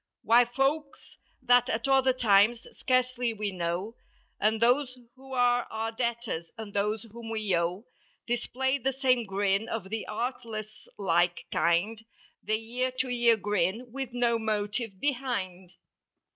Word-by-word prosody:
Why 240 +2 +6
folks 275 +4 -1 0.4
that 245 -1 +4
at 230 +3 -1
other 265 -1 +4
times, 230 -1 +3
scarcely 255 -2 0
we 210 -2 -3
know. 180 +5 -3 0.4
And 220 +1 +2
those 250 +2 +2 0.2
who're 265 0 -8
our 245 -2 +1
debtors 230 -8 -3
and 215 -2 -8
those 210 +2 0
whom 230 0 -10
we 215 -4 0
owe 175 +6 -1 0.4
Display 260 +3 -1
the 270 +2 0
same 255 -3 +1
grin 195 +2 0
of 200 -4 -4
the 220 0 -3
artless 215 -2 -5
like 175 -2 +1
kind 195 +7 +1 0.4
The 215 +1 0 0.2
ear 255 0 +2
to 260 -1 -1
ear 240 -2 +4
grin 205 +4 -1
with 265 -1 -5
no 240 -1 +1
motive 210 -1 -2
behind. 215 -10 -2
230 Hz, 135 wpm, -28 LUFS, 205-250 Hz, 0.4 s, Why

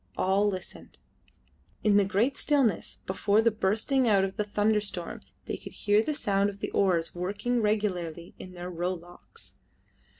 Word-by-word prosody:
All 195 +2 +2
listened. 185 -2 -8 0.9
In 210 -2 +4
the 205 - +5
great 215 +8 +1
stillness 275 - +1
before 200 +2 +1
the 230 +1 +4
bursting 220 +6 +1
out 200 -3 +4
of 195 0 -2
the 210 - 0
thunderstorm 205 -3 -1 0.2
they - - -4
could - - -11
hear 205 +1 +2
the 300 +6 -2
sound 200 -4 +1
of 200 0 -10
oars 175 -4 +1
working 205 +7 -1
regularly 180 -6 -1
in 185 - -9
their 180 0 -6
row 180 +2 -2
locks. 175 - -16
200 Hz, 155 wpm, -28 LUFS, 185-215 Hz, 0.9 s, the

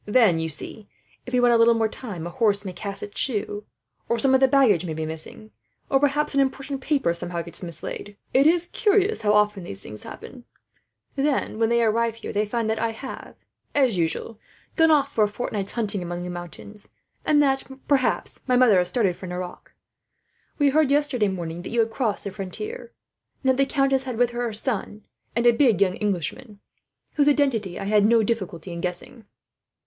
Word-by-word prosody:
"Then, 210 -7 +4
you 160 0 -2
see, 200 +7 -6 0.4
if 250 - -7
we 250 - +4
want 245 -1 +5
a - - +5
little 230 0 +5
more 225 -1 +2
time, 205 -7 -7
a 175 - -5
horse 205 0 +1
may 185 - -5
cast 200 +2 -5
its 205 - -6
shoe, 210 -4 -1 0.4
or 235 - +2
some 265 +3 +3
of 265 - +6
the 265 - +5
baggage 255 - +4
may 160 -3 -4
be 160 0 -3
missing, 160 +7 -7 0.4
or 270 - +4
perhaps 290 +2 +1
an 280 - +2
important 275 0 -1
paper 270 - +1
somehow 170 0 -4
gets 170 - -10
mislaid. 180 +4 -7 0.2
It 275 +3 +5
is 345 +1 +3
curious 415 +2 +2
how 210 -1 +2
often 210 -2 +2
these 100 - -8
things 105 - -9
happen. 250 -2 -10 0.7
Then, 275 -5 0
when 225 -1 +3
they 235 0 +3
arrive 230 +1 +1
here 230 - -7
they 210 +1 0
find 230 +1 -1
that 220 0 0
I 225 -1 -1
have, 265 +4 -9 0.4
as 260 -7 +3
usual, 170 +7 -2 0.4
gone 325 -1 +5
off 300 -3 +3
for 220 - +3
a - - +3
fortnight's 205 -2 -4
hunting 210 -4 -1
among 175 0 -4
the 180 - -5
mountains; 175 +4 -7 0.3
and 300 -1 +3
that, 270 -1 +1 0.2
perhaps, 275 -3 +1
my 250 - +3
mother 245 -7 +6
has 180 0 +1
started 195 -4 +1
for 185 - -9
Nerac. 180 0 -7 0.9
"We 285 -2 +4
heard 305 -1 +3
yesterday 280 -6 +2
morning 175 -3 -4
that - - -7
you 235 - -1
had 225 0 +2
crossed 225 -3 -1
the 200 - -4
frontier, 425 - -6 0.5
and 265 - +2
that 260 - -1
the 275 -1 +1
countess 270 -1 +2
had 250 -3 -4
with 245 0 +2
her 240 0 -4
her 235 -2 -2
son, 210 -2 -3 0.3
and 235 +1 +1
a 240 - +8
big 230 -5 +3
young 190 -2 +3
Englishman, 205 +3 -3 0.6
whose 290 0 +5
identity 240 - +1
I - - -4
had 205 +1 +3
no 230 0 +4
difficulty 190 -6 -3
in 170 0 -5
guessing." 180 +6 -5
225 Hz, 205 wpm, -24 LUFS, 190-265 Hz, 0.9 s, a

